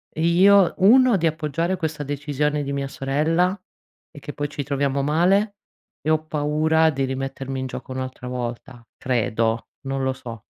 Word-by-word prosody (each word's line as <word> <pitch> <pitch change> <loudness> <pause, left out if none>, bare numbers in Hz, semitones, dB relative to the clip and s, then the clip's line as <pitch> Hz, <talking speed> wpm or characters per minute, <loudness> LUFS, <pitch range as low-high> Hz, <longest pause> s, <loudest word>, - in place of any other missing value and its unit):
io, 180 +4 +5
1 245 +5 +6
di 170 -3 +2
appoggiare 160 +3 -1
questa 160 -3 -3
decisione 145 +1 -1
di 140 0 -4
mia 140 0 -2
sorella 160 +8 0 0.5
e 145 - -12
che 145 - -8
poi 145 0 -3
ci 145 -1 -4
troviamo 140 0 -1
male 190 +8 +2 0.5
e 155 - -2
ho 155 0 +1
paura 155 +1 +2
di 135 -3 -1
rimettermi 135 0 -4
in 130 - -3
gioco 130 - -8
un'altra 130 -1 -5
volta. 120 -1 -6
Credo, 115 -2 0 0.2
non 135 0 -3
lo 130 0 0
so. 115 -4 -9
145 Hz, 160 wpm, -23 LUFS, 135-160 Hz, 0.5 s, 1